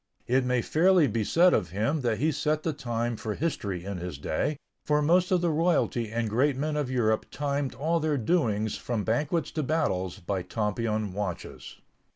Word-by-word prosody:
It 130 Hz, +2 st, +2 dB
may 125 Hz, -1 st, +1 dB
fairly 180 Hz, +1 st, +4 dB
be 115 Hz, -3 st, 0 dB
said 175 Hz, -, +4 dB
of 90 Hz, -5 st, +1 dB
him 110 Hz, -, 0 dB
that 115 Hz, -4 st, 0 dB
he 155 Hz, +3 st, +1 dB
set 150 Hz, +1 st, -1 dB
the 160 Hz, -, -1 dB
time 120 Hz, -2 st, -2 dB
for 110 Hz, -1 st, -4 dB
history 100 Hz, -, -3 dB
in 100 Hz, -2 st, -4 dB
his 90 Hz, -4 st, -5 dB
day, 110 Hz, -, -1 dB, 0.3 s
for 150 Hz, 0 st, +2 dB
most 175 Hz, +4 st, +3 dB
of 185 Hz, -2 st, +2 dB
the 175 Hz, -2 st, +2 dB
royalty 150 Hz, -8 st, +1 dB
and 115 Hz, 0 st, -1 dB
great 130 Hz, +6 st, +1 dB
men 150 Hz, +2 st, -1 dB
of 145 Hz, -4 st, -1 dB
Europe 110 Hz, -4 st, +1 dB
timed 140 Hz, -1 st, -2 dB
all 165 Hz, +4 st, 0 dB
their 155 Hz, -2 st, 0 dB
doings 110 Hz, -, +1 dB
from 115 Hz, -4 st, -2 dB
banquets 145 Hz, -, 0 dB
to 155 Hz, -, -2 dB
battles 130 Hz, -, -1 dB
by 95 Hz, 0 st, -3 dB
Tompion 105 Hz, +1 st, -2 dB
watches. 100 Hz, -3 st, -5 dB
125 Hz, 190 wpm, -27 LUFS, 105-155 Hz, 0.3 s, fairly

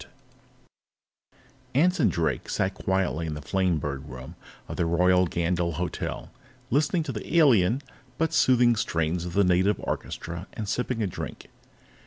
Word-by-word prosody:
_ -, -, -10 dB, 1.7 s
Anson 165 Hz, -2 st, +4 dB
Drake 80 Hz, -6 st, -1 dB
sat 95 Hz, +1 st, 0 dB
quietly 95 Hz, -4 st, -1 dB
in 75 Hz, -, -3 dB
the -, -, -5 dB
Flamebird 75 Hz, -5 st, -1 dB
Room 65 Hz, 0 st, -9 dB, 0.3 s
of -, -, -5 dB
the 85 Hz, -, +1 dB
Royal 90 Hz, +2 st, +3 dB
Gandyll 85 Hz, 0 st, 0 dB
Hotel, 90 Hz, +3 st, -4 dB, 0.4 s
listening 150 Hz, +6 st, +2 dB
to 145 Hz, -, -4 dB
the 120 Hz, +8 st, -3 dB
alien, 125 Hz, -, +4 dB, 0.3 s
but 160 Hz, -1 st, 0 dB
soothing 120 Hz, -2 st, +4 dB
strains 85 Hz, -4 st, -1 dB
of 90 Hz, -, -5 dB
the 100 Hz, -, +4 dB
native 90 Hz, +3 st, +3 dB
orchestra 85 Hz, +3 st, -5 dB
and 110 Hz, -, -5 dB
sipping 120 Hz, +1 st, -1 dB
a -, -, +1 dB
drink. 90 Hz, -, -7 dB
90 Hz, 145 wpm, -26 LUFS, 85-120 Hz, 1.7 s, Anson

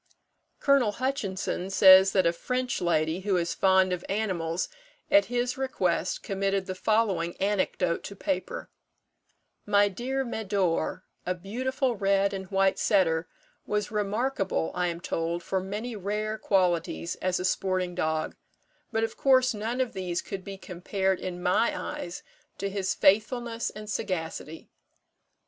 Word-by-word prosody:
Col. 275 Hz, -7 st, +3 dB
Hutchinson 200 Hz, -7 st, -2 dB
says 190 Hz, 0 st, +8 dB
that 190 Hz, -3 st, +3 dB
a 170 Hz, -, +3 dB
French 250 Hz, +7 st, -2 dB
lady, 165 Hz, -1 st, +1 dB
who 190 Hz, -1 st, +1 dB
is 170 Hz, -1 st, 0 dB
fond 190 Hz, -1 st, +4 dB
of 180 Hz, -, -4 dB
animals, 185 Hz, -5 st, -1 dB, 0.4 s
at 300 Hz, +1 st, +6 dB
his 245 Hz, +1 st, -1 dB
request 185 Hz, -9 st, 0 dB
committed 195 Hz, 0 st, -1 dB
the 185 Hz, -, -4 dB
following 190 Hz, -4 st, +1 dB
anecdote 190 Hz, -3 st, 0 dB
to 200 Hz, -, -7 dB
paper: 470 Hz, -, -3 dB, 1.0 s
"My 205 Hz, 0 st, +4 dB
dear 260 Hz, +7 st, -2 dB
Médor, 195 Hz, -6 st, -1 dB, 0.2 s
a 180 Hz, -, -1 dB
beautiful 255 Hz, +7 st, -1 dB
red 195 Hz, 0 st, +2 dB
and 190 Hz, -1 st, -5 dB
white 195 Hz, -1 st, +2 dB
setter, 165 Hz, -5 st, +2 dB, 0.4 s
was 210 Hz, 0 st, -1 dB
remarkable, 210 Hz, -3 st, -1 dB
I 180 Hz, 0 st, 0 dB
am 170 Hz, 0 st, -4 dB
told, 170 Hz, 0 st, -2 dB
for 190 Hz, -, -1 dB
many 210 Hz, +5 st, -4 dB
rare 210 Hz, +2 st, -2 dB
qualities 175 Hz, -, +1 dB
as 185 Hz, -1 st, 0 dB
a 180 Hz, -, -2 dB
sporting 185 Hz, -1 st, 0 dB
dog; 155 Hz, -1 st, -1 dB, 0.6 s
but, 225 Hz, 0 st, 0 dB
of 225 Hz, -, -2 dB
course, 255 Hz, -2 st, +4 dB
none 225 Hz, +4 st, -3 dB
of 255 Hz, -2 st, 0 dB
these 180 Hz, -2 st, -3 dB
could 195 Hz, -2 st, -6 dB
be 195 Hz, 0 st, -7 dB
compared, 190 Hz, +1 st, -2 dB
in 180 Hz, -1 st, -5 dB
my 210 Hz, +6 st, +2 dB
eyes, 175 Hz, 0 st, -5 dB, 0.3 s
to 200 Hz, 0 st, -3 dB
his 195 Hz, -1 st, -1 dB
faithfulness 230 Hz, +3 st, +2 dB
and 215 Hz, 0 st, -9 dB
sagacity. 165 Hz, -5 st, -4 dB
195 Hz, 140 wpm, -28 LUFS, 180-220 Hz, 1.0 s, says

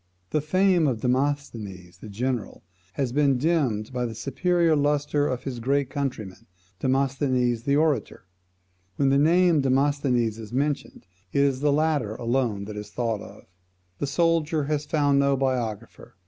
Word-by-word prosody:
The 150 Hz, -, +1 dB
fame 180 Hz, +1 st, +3 dB
of 120 Hz, -5 st, -1 dB
Demosthenes 115 Hz, -9 st, -2 dB
the 110 Hz, -, -10 dB
general, 120 Hz, +2 st, -3 dB, 0.3 s
has 130 Hz, +3 st, -2 dB
been 140 Hz, -1 st, +2 dB
dimmed 130 Hz, -7 st, 0 dB
by 125 Hz, -1 st, -1 dB
the 115 Hz, -, -7 dB
superior 170 Hz, +6 st, +1 dB
lustre 145 Hz, 0 st, +1 dB
of 125 Hz, 0 st, -3 dB
his 130 Hz, -3 st, -5 dB
great 135 Hz, +2 st, 0 dB
countryman, 125 Hz, -10 st, -5 dB, 0.3 s
Demosthenes 130 Hz, -3 st, +1 dB
the 140 Hz, -, +2 dB
orator. 150 Hz, -11 st, 0 dB, 0.7 s
When 135 Hz, +5 st, +2 dB
the 140 Hz, +1 st, +3 dB
name 170 Hz, +2 st, +4 dB
of -, -, +3 dB
Demosthenes 130 Hz, -4 st, +1 dB
is 110 Hz, -1 st, -9 dB
mentioned, 140 Hz, +2 st, -2 dB, 0.3 s
it 140 Hz, -, +2 dB
is 135 Hz, -2 st, +1 dB
the 145 Hz, +1 st, +2 dB
latter 145 Hz, -7 st, 0 dB
alone 115 Hz, -4 st, -1 dB
that 105 Hz, 0 st, -7 dB
is 105 Hz, 0 st, -7 dB
thought 115 Hz, -2 st, -2 dB
of. -, -, -12 dB, 0.6 s
The 145 Hz, -, -1 dB
soldier 160 Hz, 0 st, +1 dB
has 150 Hz, 0 st, -2 dB
found 145 Hz, -3 st, +2 dB
no 140 Hz, 0 st, +2 dB
biographer. 120 Hz, -7 st, -3 dB
135 Hz, 155 wpm, -25 LUFS, 120-145 Hz, 0.7 s, name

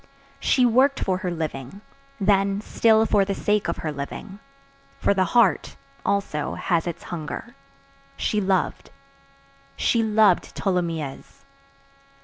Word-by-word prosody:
She 255 Hz, -, +3 dB
worked 260 Hz, +4 st, +3 dB
for 185 Hz, -1 st, -1 dB
her 185 Hz, -2 st, -3 dB
living; 160 Hz, +1 st, -5 dB, 0.4 s
then, 195 Hz, 0 st, +2 dB
still 220 Hz, 0 st, +3 dB
for 205 Hz, -2 st, +3 dB
the 195 Hz, 0 st, -2 dB
sake 210 Hz, 0 st, 0 dB
of 170 Hz, -, -2 dB
her 155 Hz, -, -1 dB
living,—for 140 Hz, -1 st, -6 dB
the 190 Hz, -1 st, +2 dB
heart, 200 Hz, -10 st, +3 dB, 0.3 s
also, 195 Hz, -7 st, -1 dB
has 170 Hz, -2 st, 0 dB
its 170 Hz, -1 st, -5 dB
hunger,—she 140 Hz, +2 st, -6 dB
loved. 190 Hz, -2 st, -1 dB, 0.9 s
She 230 Hz, -, +2 dB
loved 215 Hz, -4 st, +3 dB
Tholomyès. 165 Hz, -7 st, -3 dB
185 Hz, 115 wpm, -24 LUFS, 150-205 Hz, 0.9 s, She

